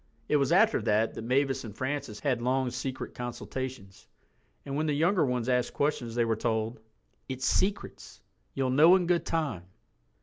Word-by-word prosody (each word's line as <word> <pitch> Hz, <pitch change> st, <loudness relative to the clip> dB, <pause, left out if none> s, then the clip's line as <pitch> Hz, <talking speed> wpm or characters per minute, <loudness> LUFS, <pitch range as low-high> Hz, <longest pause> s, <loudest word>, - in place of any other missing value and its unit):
It 150 Hz, -, +3 dB
was 140 Hz, +2 st, +1 dB
after 195 Hz, +6 st, +4 dB
that 110 Hz, +1 st, +1 dB
that -, -, -6 dB
Mavis 135 Hz, +3 st, 0 dB
and 110 Hz, -3 st, -9 dB
Francis 130 Hz, -5 st, -3 dB
had 130 Hz, -5 st, 0 dB
long 130 Hz, +1 st, 0 dB
secret 130 Hz, +1 st, -5 dB
consultations—and 120 Hz, -, -8 dB
when 155 Hz, +2 st, 0 dB
the 150 Hz, -, +1 dB
younger 170 Hz, +4 st, +3 dB
ones 125 Hz, -3 st, -1 dB
asked 125 Hz, -1 st, 0 dB
questions 130 Hz, -6 st, -1 dB
they 120 Hz, -1 st, +2 dB
were 115 Hz, -1 st, +1 dB
told, 110 Hz, 0 st, -2 dB, 0.5 s
"It's 130 Hz, 0 st, -3 dB
secrets. 200 Hz, +2 st, -1 dB, 0.4 s
You'll 130 Hz, -2 st, 0 dB
know 160 Hz, +7 st, +7 dB
in 185 Hz, -2 st, +1 dB
good 170 Hz, -1 st, +1 dB
time." 150 Hz, -, -2 dB
130 Hz, 165 wpm, -29 LUFS, 115-150 Hz, 0.5 s, know